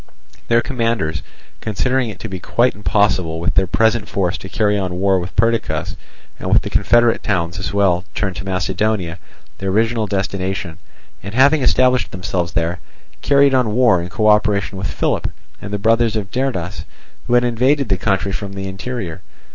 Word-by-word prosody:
Their 115 0 +3
commanders, 115 - -1 0.4
considering 125 +3 0
it 105 - -8
to - - -5
be 95 -3 -6
quite 120 +7 +1
impossible 95 -4 +1
with 85 - -1
their 95 - +2
present 110 +2 +1
force 95 -1 0
to 95 - -9
carry 105 0 +1
on 95 -3 -2
war 95 -1 +3
with 90 +1 -7
Perdiccas 115 0 0 0.4
and - - -3
with - - +4
the - - -5
confederate 120 -1 +3
towns 90 -4 -1
as 90 - -3
well 95 -3 +2
turned 95 -3 -2
to 95 - -5
Macedonia, 95 -1 -1 0.4
their 95 - -2
original 110 +2 +1
destination, 95 -3 -3 0.4
and, 100 +4 -7
having 140 +4 +5
established 125 0 +3
themselves 90 -2 -3
there, 85 +2 -1 0.4
carried 140 0 +4
on 120 -5 +2
war 115 -8 +4
in 85 - -6
co 110 +3 0
operation 105 -2 +2
with 95 +1 -3
Philip, - - -1 0.3
and 100 - -7
the 105 - -1
brothers 115 +2 +2
of 100 -3 -3
Derdas, 125 -10 -2 0.4
who 120 - +2
had 120 - +4
invaded 125 +2 +1
the 95 - +2
country 100 0 0
from 100 0 -5
the 95 0 -5
interior. 95 -3 -5
100 Hz, 175 wpm, -19 LUFS, 95-115 Hz, 0.4 s, having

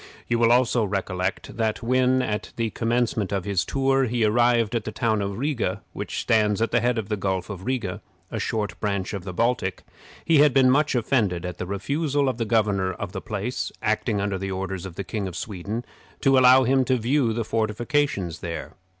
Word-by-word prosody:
You 120 -1 +1
will 115 0 +4
also 125 -1 +3
recollect 95 0 -3
that 110 0 -1
when, 130 +1 +3
at 105 -3 -3
the 115 -2 -1
commencement 115 -3 0
of 100 -2 -1
his 100 -4 +1
tour, 135 +4 +1
he 120 -2 +1
arrived 120 0 +3
at 115 -2 0
the 110 - -5
town 110 -1 0
of 100 0 -3
Riga, 140 -2 -1
which - - -4
stands 105 -2 +2
at 115 - 0
the 120 - +3
head 120 0 +1
of 110 -3 -2
the 105 - -1
Gulf 95 -1 -2
of 95 -1 -8
Riga, 120 -9 -2 0.3
a - - -3
sort 105 -2 -1
of - - -21
branch 100 -2 -2
of 95 -3 -5
the 95 - -4
Baltic, 110 -2 0 0.4
he 160 -3 +4
had 145 -2 +5
been 130 -2 +6
much 150 +1 +2
offended 110 -8 +1
at 90 -1 -6
the 90 - -4
refusal 140 - 0
of 125 -2 -4
the 115 - 0
governor 105 -4 +1
of 100 0 -6
the 95 -1 -5
place, 110 +4 -3
acting 110 0 0
under 100 -1 -1
the 95 +1 -3
orders 95 -1 -4
of 90 - -11
the 100 - -4
King 100 -1 -3
of 90 - -7
Sweden, 105 +4 -5 0.4
to 135 0 +4
allow 130 0 +7
him 130 +1 +3
to 130 0 +2
view 125 +1 +1
the 115 0 -2
fortifications 110 - -1
there. 85 -2 -6
110 Hz, 210 wpm, -24 LUFS, 100-125 Hz, 0.4 s, allow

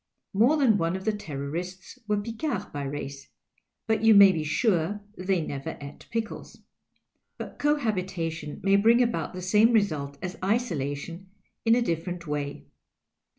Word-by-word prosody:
More 240 +10 +4
than 235 -8 +4
one 165 +2 0
of 190 +1 -6
the 220 - +2
Terrorists 180 - -6
were 210 -1 +1
Picards 230 +8 -3
by 145 - -6
race, 140 0 -6 0.6
but 220 0 0
you 225 -1 +7
may 200 -1 +9
be 160 -4 -2
sure 185 +3 +1
they 185 -3 0
never 135 -1 -5
ate 140 0 -10
pickles. 225 -1 -5 0.7
But - - -8
cohabitation 185 - -1
may 195 +1 +5
bring 230 +4 +5
about 235 -5 -2
the 185 - -6
same 210 +5 +4
result 155 -10 +1
as 180 0 -6
isolation, 175 - -2 0.4
in 225 0 +6
a 245 - +2
different 170 -2 -3
way. 145 -2 -4
185 Hz, 150 wpm, -27 LUFS, 155-220 Hz, 0.7 s, may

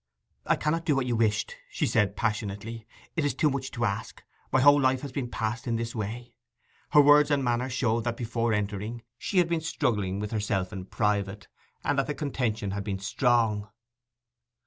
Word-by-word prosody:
'I - - +4
cannot 165 +2 -1
do 150 -4 +3
what 135 -2 +1
you 120 -2 0
wished!' 105 -2 0
she - - -1
said 105 -2 +2
passionately. 110 0 -3 0.3
'It 160 - +1
is 145 - 0
too 150 -3 +2
much 135 -1 -3
to 120 -1 -2
ask. 100 -2 -4 0.3
My 130 - +4
whole 145 +2 +7
life 130 -1 +2
ha' 140 -3 -6
been 125 -3 -3
passed 115 +2 -3
in 115 - +1
this 115 0 -3
way.' 120 +3 -5 0.6
Her 150 - +7
words 145 +1 +6
and 140 -2 +2
manner 120 +1 0
showed 120 -2 0
that 120 -1 -1
before 115 -1 -1
entering 105 +2 -2 0.2
she 195 - -2
had 175 -2 +5
been 170 -1 0
struggling 105 -12 -1
with 105 0 -4
herself 100 -3 -1
in 95 -2 -6
private, 100 -2 -1 0.4
and 140 - +1
that 135 - 0
the 150 - -2
contention 120 -8 -2
had 100 +1 -3
been 100 -1 -2
strong. 105 0 +1
115 Hz, 190 wpm, -28 LUFS, 105-135 Hz, 0.6 s, whole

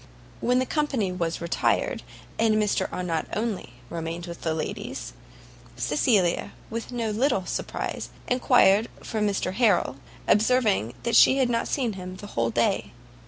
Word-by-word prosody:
When 250 +1 +2
the 255 - +2
company 265 - 0
was 170 -2 -2
retired, 170 - 0 0.4
and 220 -1 +4
Mr 210 -1 +1
Arnott 170 -3 -2
only 210 - -3
remained 165 +2 -5
with 170 -1 -8
the 160 -1 -1
ladies, 155 - -5 0.6
Cecilia, 180 - +1 0.2
with 230 +2 -4
no 230 -3 -1
little 225 -3 +1
surprise, - - -4 0.2
inquired 240 -4 +4 0.2
for 220 -2 -3
Mr 200 -3 0
Harrel, 200 - +2 0.3
observing 210 - +3
that 235 - +1
she 265 - +7
had 255 -3 +2
not 230 0 0
seen 245 -6 0
him 185 -1 -7
the 205 - -9
whole 115 0 +1
day. - - 0
210 Hz, 145 wpm, -26 LUFS, 175-235 Hz, 0.6 s, she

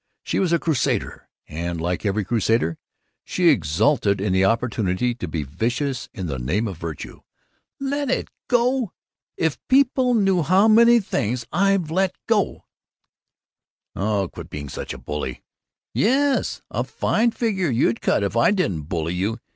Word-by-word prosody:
She - - -1
was 185 -3 +1
a 170 - +4
crusader 155 -6 -1 0.2
and, 85 +1 -4
like 90 +5 -2
every 100 +1 0
crusader, 110 -6 +1 0.4
she 180 -2 +2
exulted 100 - +2
in 95 -1 0
the 95 0 +3
opportunity 115 0 +1
to 105 -6 -6
be 80 -1 -3
vicious 120 - -2
in 95 -7 -6
the 70 -6 -3
name 90 - -1
of 95 -5 -6
virtue. 80 -2 -7 0.6
"Let 280 0 -2
it - - -1 0.2
go? 245 -2 +1 0.4
If 160 -3 0
people 260 -2 +3
knew 195 -4 +3
how 185 +7 +4
many 235 +2 +6
things 120 - -2
I've 190 -2 +2
let 185 +1 +1
go 215 -3 0 0.7
" - - -68
"Oh, 100 -1 0
quit - - -9
being 75 -1 -6
such - - -6
a 65 - -6
bully." 75 +4 -5 0.5
"Yes, 275 +4 +1
a - - -1
fine 230 +2 +1
figure 205 -7 -1
you'd 115 -1 +1
cut - - +1
if 100 +2 -2
I 115 - +4
didn't 95 - -1
bully 85 -1 -2
you! 100 +6 -1
120 Hz, 155 wpm, -22 LUFS, -, 0.7 s, many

